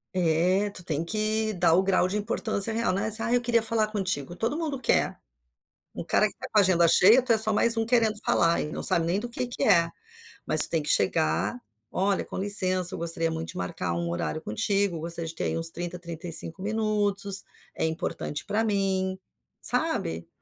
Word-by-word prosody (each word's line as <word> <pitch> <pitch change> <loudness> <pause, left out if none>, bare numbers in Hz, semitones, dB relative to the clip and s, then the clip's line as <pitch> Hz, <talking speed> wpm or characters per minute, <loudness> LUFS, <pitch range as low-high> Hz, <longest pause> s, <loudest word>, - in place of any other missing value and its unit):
eh, 180 +4 0
tu 185 -3 -1
tem 160 -2 -3
que 215 +3 -1
dar 170 -2 +1
o 185 - +3
grau 185 -1 0
de 205 +3 -3
importância 220 0 -2
real, 225 -4 -1
né. 205 +3 -3
"Ah, 235 +2 -2
eu 245 - +2
queria 235 -2 +1
falar 220 -1 +1
contigo.", 185 -7 -4
todo 230 +9 -3
mundo 305 -5 -4
quer, 235 - -1 0.8
um - - -6
cara - - +1
que - - -7
está - - -10
com 215 - +2
a - - +7
agenda 175 -3 +2
cheia, 225 +10 +5
tu 245 -2 0
é 220 - +2
só 220 0 +5
mais 230 +2 +3
um 225 0 -2
querendo 225 -3 +1
falar 170 0 +1
e 150 - -6
não - - -6
sabe 165 -1 +7
nem 185 +4 -1
do 240 - -7
que 245 +1 -4
que 245 - -6
é. 170 -5 +3 0.6
Mas, - - +7
tu - - +9
tem 160 -3 -2
que - - -3
chegar: 95 +3 0 0.3
"Olha, 195 +1 -1
com - - -9
licença, 185 -2 +2
eu - - -6
gostaria 165 -1 +3
muito 160 0 -6
de - - -8
marcar 90 -1 -4
um 85 0 -4
horário 85 - -4
contigo. 195 - -2
Gostaria 170 0 -1
de 160 - -7
ter - - -4
aí - - -3
uns 165 0 +7
30, 175 +1 -6
35 170 0 -4
minutos, 205 -2 0 0.3
é - - -4
importante 160 -2 -5
pra 220 +2 -2
mim.", 190 -3 -2 0.4
sabe, 80 0 -3
190 Hz, 210 wpm, -25 LUFS, 165-215 Hz, 0.8 s, tu